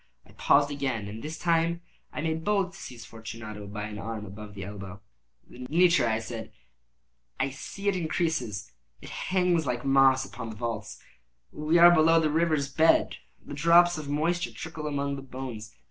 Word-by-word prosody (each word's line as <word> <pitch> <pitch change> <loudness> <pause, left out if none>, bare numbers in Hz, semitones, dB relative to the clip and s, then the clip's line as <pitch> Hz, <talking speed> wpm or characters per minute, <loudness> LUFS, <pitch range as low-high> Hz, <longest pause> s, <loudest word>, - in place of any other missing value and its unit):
I - - -19
paused 145 0 +3
again, 130 -7 -2
and 110 +2 -7
this 155 +2 -6
time 170 0 +1 0.3
I - - -4
made 160 0 -2
bold 195 -2 +1
to 195 - -12
seize 120 -3 -9
Fortunato 110 -2 -8
by 105 +1 -5
an 105 0 -6
arm 110 0 -5
above 105 +1 -10
the 100 - -6
elbow. 100 -1 -8 0.5
"The 125 +1 -9
nitre!" 170 -5 +4
I 110 -1 +1
said: 110 0 -7 1.0
"see, 195 +9 -7
it 200 - +3
increases. 160 - -2 0.3
It - - -11
hangs 180 -4 +1
like 125 +1 -2
moss 135 -1 +5
upon 120 -3 -7
the 110 - -7
vaults. 115 +1 -5 0.5
We 155 +3 +1
are 175 0 +9
below 165 0 +5
the 155 -2 +1
river's 155 -3 +1
bed. 160 +4 +3 0.3
The - - -8
drops 170 +3 +5
of 145 -2 -7
moisture 170 +5 0
trickle 160 -2 -6
among 140 -1 -2
the - - -7
bones. 130 -5 -7
140 Hz, 175 wpm, -28 LUFS, 115-165 Hz, 1.0 s, are